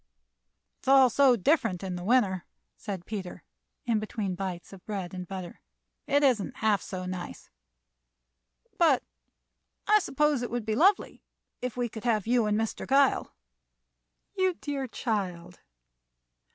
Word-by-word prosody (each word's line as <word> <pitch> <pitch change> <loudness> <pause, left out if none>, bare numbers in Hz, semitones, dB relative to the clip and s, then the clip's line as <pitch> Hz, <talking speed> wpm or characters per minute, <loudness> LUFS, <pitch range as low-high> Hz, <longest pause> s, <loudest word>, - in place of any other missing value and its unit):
"It's - - -20
all 265 -2 +6
so 270 0 +5
different 225 - +1
in 185 -2 -3
the 175 - -6
winter," 195 -5 +2 0.3
said 195 -5 -6
Peter, 195 -5 -6 0.4
in 230 -3 +1
between 210 -2 -3
bites 180 -1 -5
of 190 -1 -13
bread 195 -4 -4
and 180 -1 -6
butter. 185 -2 -7 0.5
"It 285 +1 +3
isn't 250 -3 +2
half 215 -5 +1
so 185 -2 -6
nice, 180 -1 -7 1.3
but 310 -7 +4 0.8
I 425 0 +5
suppose 300 - +1
it 245 - -3
would 240 -1 -3
be 220 - -1
lovely 375 - +2 0.4
if 250 -1 -4
we 245 -1 0
could 220 -1 -9
have 220 -5 +1
you 235 -1 +2
and 210 0 +1
Mr. 225 -1 -3
Gile 275 0 +2 0.5
" - - -52
"You 375 -1 +2
dear 280 -4 -4
child!" 195 -8 -3
220 Hz, 145 wpm, -28 LUFS, 185-260 Hz, 1.3 s, all